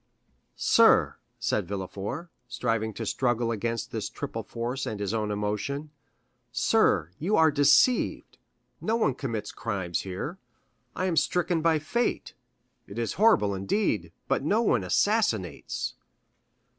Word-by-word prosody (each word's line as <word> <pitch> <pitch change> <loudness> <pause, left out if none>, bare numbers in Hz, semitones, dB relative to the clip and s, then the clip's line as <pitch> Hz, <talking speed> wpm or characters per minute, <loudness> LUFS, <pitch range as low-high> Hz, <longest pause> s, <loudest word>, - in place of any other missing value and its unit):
"Sir," - - +4 0.2
said - - -1
Villefort, 100 - -5 0.2
striving 115 -3 -1
to 115 - -4
struggle 120 0 0
against 115 +1 -3
this - - -3
triple - - -5
force 120 +3 -4
and 110 -2 -4
his 100 0 -2
own 110 -2 -1
emotion,—"sir, 125 - -1
you 195 +7 +1
are 160 -1 +5
deceived; 145 - +3 0.4
no 220 - 0
one 220 - +2
commits 115 -5 -4
crimes 95 -6 -3
here. 100 - -5 0.6
I 185 - -1
am 175 -3 0
stricken 175 -1 +1
by 165 -1 +3
fate. 190 +11 -1 0.5
It 100 - -10
is 115 -1 -1
horrible, 210 - +5
indeed, 95 - -1 0.2
but - - +1
no 210 +10 +2
one 120 - +2
assassinates." 110 - 0
120 Hz, 125 wpm, -27 LUFS, 105-160 Hz, 0.6 s, are